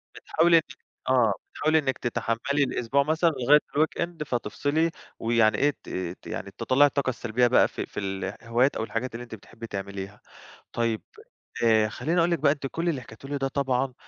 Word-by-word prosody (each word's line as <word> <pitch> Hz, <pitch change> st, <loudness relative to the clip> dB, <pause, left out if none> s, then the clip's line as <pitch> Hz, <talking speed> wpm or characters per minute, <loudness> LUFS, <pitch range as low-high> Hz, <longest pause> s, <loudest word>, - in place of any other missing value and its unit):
بتحاولي 170 Hz, +1 st, +3 dB
إنِّك 135 Hz, -5 st, -2 dB, 0.3 s
آه 120 Hz, -5 st, +4 dB, 0.2 s
بتحاولي 155 Hz, +1 st, +2 dB
إنِّك 135 Hz, -3 st, -1 dB
تتحمّلي 120 Hz, +4 st, 0 dB
الأسبوع 135 Hz, +1 st, +1 dB
مثلًا 160 Hz, +3 st, +2 dB
لغاية 145 Hz, 0 st, +4 dB, 0.2 s
الweekend 160 Hz, +1 st, 0 dB
فتفصلي 145 Hz, +7 st, 0 dB, 0.3 s
ويعني 115 Hz, -2 st, +3 dB
إيه 145 Hz, +1 st, +3 dB
ت -, -, -11 dB, 0.3 s
ت -, -, -13 dB
يعني 100 Hz, -, -5 dB
تطلّعي 130 Hz, +5 st, +4 dB
الطاقة 140 Hz, -2 st, -1 dB
السلبية 120 Hz, 0 st, +1 dB
بقى 125 Hz, -, +5 dB
في -, -, -5 dB
في -, -, -7 dB
الهوايات 115 Hz, +6 st, -1 dB
أو -, -, -2 dB
الحاجات 115 Hz, +2 st, -3 dB
اللي 120 Hz, -, -6 dB
أنتِ 115 Hz, -2 st, -8 dB
بتحبي 115 Hz, +3 st, -11 dB
تعمليها. 100 Hz, 0 st, -6 dB, 0.5 s
طيب 115 Hz, -2 st, -1 dB, 0.6 s
آآ، 110 Hz, -2 st, +4 dB
خلّيني 160 Hz, +10 st, -1 dB
اقول 170 Hz, +1 st, +3 dB
لِك 170 Hz, -, +1 dB
بقى 140 Hz, 0 st, +4 dB
أنتِ 140 Hz, -2 st, -4 dB
كل 165 Hz, +5 st, -2 dB
اللي 150 Hz, -6 st, 0 dB
حكيتيه 115 Hz, +3 st, -12 dB
لي 145 Hz, 0 st, -2 dB
ده 135 Hz, 0 st, 0 dB
طبعًا 135 Hz, -2 st, 0 dB
130 Hz, 180 wpm, -26 LUFS, 115-145 Hz, 0.6 s, بقى